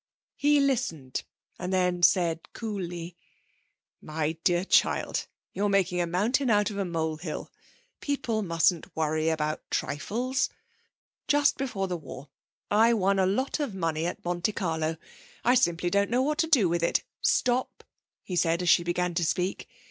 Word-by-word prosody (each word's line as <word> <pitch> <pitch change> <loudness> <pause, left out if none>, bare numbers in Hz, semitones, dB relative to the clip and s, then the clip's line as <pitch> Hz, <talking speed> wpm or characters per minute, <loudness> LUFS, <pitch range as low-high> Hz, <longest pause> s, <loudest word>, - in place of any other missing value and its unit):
He 290 +1 +3
listened, 235 - -1 0.4
and 180 +1 -3
then 180 -1 +1
said 170 -2 +2
cooly: 180 -6 -5 0.9
'My 155 0 -2
dear 175 0 +2
child, - - +2 0.3
you're 205 +1 0
making 185 -3 +2
a 170 - 0
mountain 225 +10 +1
out 210 0 +3
of 200 - -5
a 195 - 0
molehill. 160 -1 -3 0.5
People 260 -6 -1
mustn't 170 -2 +1
worry 155 0 0
about 155 -1 -1
trifles. 240 - -1 0.8
Just 290 0 +3
before 210 -8 -2
the 180 -1 -2
war 140 -2 -10 0.4
I 225 +3 +5
won 195 -1 +2
a 190 - +3
lot 260 +11 0
of 275 -10 -2
money 165 -2 -1
at 175 - -6
Monte 175 +4 -1
Carlo. 160 -4 -1 0.5
I 245 - +5
simply 175 -7 +2
don't 200 +1 +2
know 250 +2 +2
what 300 +2 -1
to 325 - +2
do 260 - +4
with 170 0 0
it. 170 - +1 0.2
Stop!' 250 +1 +1 0.4
he 185 - -5
said, 170 0 +1
as 175 - +1
she 170 - +5
began 175 +1 -1
to 170 0 0
speak. 180 +3 -1
180 Hz, 155 wpm, -27 LUFS, 165-225 Hz, 0.9 s, I